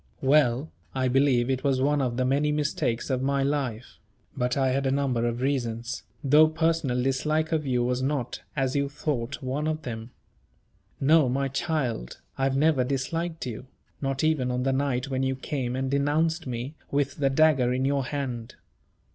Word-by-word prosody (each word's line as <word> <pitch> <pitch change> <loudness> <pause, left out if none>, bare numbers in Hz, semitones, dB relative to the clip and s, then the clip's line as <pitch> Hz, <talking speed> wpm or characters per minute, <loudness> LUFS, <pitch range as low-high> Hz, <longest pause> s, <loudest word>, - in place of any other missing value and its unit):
Well, 135 0 +3 0.2
I 130 -1 +1
believe 130 -2 +3
it 130 -1 -1
was 135 -2 +2
one 145 +2 +2
of 120 -2 -1
the 130 - +1
many 145 +3 +2
mistakes 145 -5 -1
of 130 -1 0
my 140 0 +1
life; 135 -5 -2 0.4
but 125 -1 0
I 135 -1 +2
had 135 +1 0
a - - +2
number 130 -4 +1
of 120 +1 -2
reasons, 125 -2 -2 0.2
though 150 +3 +6
personal 160 -6 0
dislike 155 +4 0
of 155 -3 0
you 125 -2 +1
was 125 +1 0
not, 130 -3 -2
as 135 -2 0
you 140 0 +1
thought, 140 -3 -3
one 140 +4 -2
of 155 0 -2
them. 115 -1 -6 0.9
No, 150 -1 +4
my 135 +2 0
child, 135 - -2 0.2
I 135 - 0
have 135 0 +1
never 150 -3 +3
disliked 160 +6 -2
you; 125 +1 -6 0.3
not 135 +1 -1
even 155 -5 +2
on 125 0 -1
the 135 0 +1
night 135 -1 0
when 130 0 0
you 130 0 0
came 130 -2 -3
and 130 0 -2
denounced 145 +3 +1
me, 125 +3 -4 0.2
with 140 0 0
the 140 -2 +2
dagger 135 -3 +4
in 130 +1 0
your 140 -1 +1
hand. 125 -4 -4
135 Hz, 180 wpm, -26 LUFS, 125-145 Hz, 0.9 s, though